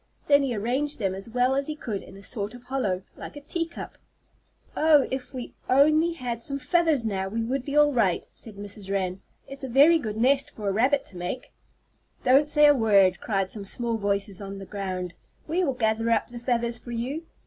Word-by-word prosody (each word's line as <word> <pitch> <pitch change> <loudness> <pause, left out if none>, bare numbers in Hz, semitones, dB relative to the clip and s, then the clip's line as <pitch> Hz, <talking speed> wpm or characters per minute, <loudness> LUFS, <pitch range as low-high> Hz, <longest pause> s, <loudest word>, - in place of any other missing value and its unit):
Then 285 -1 +5
he 265 -4 -1
arranged 260 +8 -1
them 195 -4 -1
as 195 +4 -8
well 250 +2 +2
as 275 +1 -1
he 305 - -3
could 215 -9 -4
in 195 - -13
a 195 - -13
sort 210 +1 -4
of 245 - -13
hollow, 215 -9 -1
like - - -9
a - - -7
tea 330 +3 -3
cup. 335 - -9 0.8
"Oh, 305 -3 +5
if 260 -1 -4
we 255 -3 -7 0.2
only 310 +5 +4
had 245 -7 -4
some 275 +4 -2
feathers 290 -1 +2
now, 190 -3 -1
we 225 +3 -2
would 255 +3 -2
be 280 +2 -2
all 295 -1 +5
right," 205 -8 +1
said 220 -3 -6
Mrs. 200 0 -7
Wren. 190 -1 -1 0.3
"It's 275 0 -9
a 265 - -4
very 290 +7 +6
good 215 -6 -4
nest 270 +4 +3
for 210 -2 -7
a - - +2
rabbit 265 +7 +2
to 185 - -10
make." 180 +8 -5 0.7
"Don't 275 +4 +4
say 300 0 +5
a 290 - +8
word!" 200 -7 +4
cried 195 -3 -1
some 210 - -5
small 230 +3 -2
voices 200 -1 -1
on 195 0 -6
the 195 - -8
ground. 185 -3 -4 0.3
"We 345 +4 +1
will 275 -6 +1
gather 225 -1 0
up 230 - +1
the 240 - -7
feathers 235 -1 -1
for 240 - -10
you." 250 +7 -3
240 Hz, 215 wpm, -26 LUFS, 200-280 Hz, 0.8 s, a